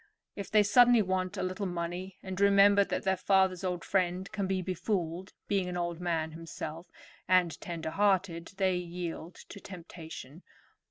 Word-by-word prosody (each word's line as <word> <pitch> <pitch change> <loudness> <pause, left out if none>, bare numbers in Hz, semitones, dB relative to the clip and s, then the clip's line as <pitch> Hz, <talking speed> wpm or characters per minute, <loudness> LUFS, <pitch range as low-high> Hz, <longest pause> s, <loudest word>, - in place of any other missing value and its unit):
If 200 - -6
they 215 -1 +5
suddenly 235 +2 +6
want 185 +1 -1
a 190 - -1
little 185 +2 -2
money 175 +2 -4
and 190 0 -5
remember 200 0 +6
that - - -3
their 190 0 +2
father's 190 -1 +2
old 180 -2 -2
friend 185 0 0
can 200 -2 -2
be 190 -1 -1
befooled, 185 -1 -2 0.2
being 195 -3 0
an 180 - -3
old 175 -1 -2
man 165 -3 -1
himself, 165 +1 -7 0.4
and 180 -3 +3
tender 165 -2 -4
hearted, 190 -3 +1
they 190 -2 +2
yielded 175 -1 -5
to 200 - -9
temptation. 165 -5 -10
185 Hz, 160 wpm, -30 LUFS, 170-195 Hz, 0.4 s, suddenly